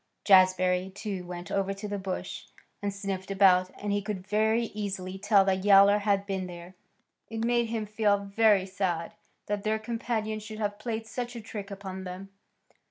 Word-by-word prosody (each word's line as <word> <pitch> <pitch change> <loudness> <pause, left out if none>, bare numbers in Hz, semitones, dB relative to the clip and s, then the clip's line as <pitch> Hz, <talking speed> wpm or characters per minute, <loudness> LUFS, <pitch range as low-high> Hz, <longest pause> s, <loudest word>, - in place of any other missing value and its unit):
Jazbury, 185 -1 +4
too, 195 -4 -5
went 175 0 -7
over 195 0 0
to 200 +2 -6
the 205 -1 -3
bush 190 -1 -5 0.4
and 205 0 -1
sniffed 195 -1 -5
about, 185 -2 +5
and 205 0 -3
he 205 0 +1
could 200 -2 -5
very 220 +3 +2
easily 190 -2 -4
tell 200 -1 +4
that 190 -1 +1
Yowler 200 0 +7
had 200 -1 +1
been 190 -2 -3
there. 175 0 -10 0.6
It 225 0 -2
made 235 -1 +2
him 225 -1 -2
feel 210 -1 +2
very 200 0 +3
sad 185 -2 -2 0.3
that 205 -1 -2
their 215 0 +1
companion 220 -1 -3
should 215 0 -8
have 205 -1 -2
played 225 0 -3
such 245 +2 -5
a - - -5
trick 210 -2 -7
upon 190 -1 -7
them. 185 +2 -7
200 Hz, 175 wpm, -28 LUFS, 190-215 Hz, 0.6 s, Yowler